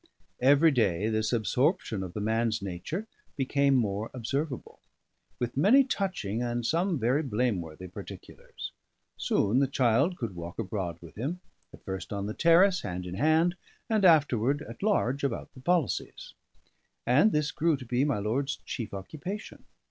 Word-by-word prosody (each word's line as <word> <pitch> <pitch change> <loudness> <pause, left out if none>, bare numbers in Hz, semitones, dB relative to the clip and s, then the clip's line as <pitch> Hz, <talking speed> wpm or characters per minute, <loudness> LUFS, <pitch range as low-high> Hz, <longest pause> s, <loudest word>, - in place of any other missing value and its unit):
Every 145 +5 +6
day 105 - +1
this 110 0 0
absorption 120 - +1
of 90 -2 -6
the 105 - -4
man's 110 +1 +1
nature 100 - -5 0.3
became 140 0 +2
more 110 -2 0
observable, 135 +3 -3 0.6
with 120 -1 -3
many 215 - +6
touching 185 - -2
and 120 -1 -2
some 170 +5 +1
very 125 +4 +2
blameworthy 105 - -2
particulars. 90 - -9 0.4
Soon 110 +6 +1
the 140 - +3
child 135 +7 +2
could 115 -6 -4
walk 85 0 -7
abroad 95 -6 -3
with 85 -1 -12
him, 145 - -3 0.3
at - - -16
first 95 0 -5
on 100 -1 -3
the 105 - -3
terrace, 180 - +5
hand 90 -2 -5
in 90 - -6
hand, 160 - +3 0.4
and 215 -2 +2
afterward 145 - +4
at - - -10
large 145 - +1
about 135 -5 -3
the 130 - -13
policies; 170 -3 -1 0.7
and 145 - +5
this 150 -3 0
grew 165 -2 +1
to 130 - -10
be 125 +3 +1
my 145 -6 +1
lord's 125 +8 -1
chief 110 -5 -5
occupation. 155 - -7
125 Hz, 155 wpm, -29 LUFS, 105-155 Hz, 0.7 s, Every